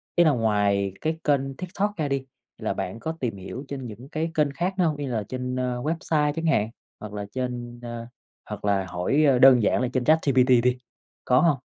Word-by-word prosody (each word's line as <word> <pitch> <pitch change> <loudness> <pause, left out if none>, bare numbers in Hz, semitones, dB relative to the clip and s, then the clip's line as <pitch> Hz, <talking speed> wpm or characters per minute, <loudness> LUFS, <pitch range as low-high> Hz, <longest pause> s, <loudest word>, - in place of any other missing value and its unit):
ý 175 - +6
là 160 - +5
ngoài 105 -5 +1
cái 160 +1 -1
kênh 135 -2 +1
TikTok 190 +3 -2
ra 155 -3 0
đi, 135 -1 -2 0.3
là - - -2
bạn 95 +5 -4
có 160 +6 -4
tìm 115 -6 -2
hiểu 95 +8 -7
trên 135 -3 -5
những 115 +5 -10
cái 160 +2 -2
kênh 150 -4 +2
khác 175 +7 -1
nữa 180 - +3
hông, 155 -3 0
như 145 -1 -4
là 110 -3 -1
trên, 125 +4 -4
ơ, 125 -1 -2
website 150 -1 0
chẳng 165 +1 -3
hạn, 110 -10 +2 0.3
hoặc 105 -1 -8
là 105 -1 -4
trên, 120 -2 -4
ơ 120 -1 -6 0.4
hoặc - - -6
là 100 -2 +2
hỏi 135 - +1 0.2
đơn 130 -3 +8
giản 105 - +2
là 125 - +1
trên 130 - +1
ChatGPT 130 -5 +4
đi, 125 0 +2 0.5
có 125 0 +4
hông? 165 -5 +3
130 Hz, 215 wpm, -25 LUFS, 115-150 Hz, 0.5 s, đơn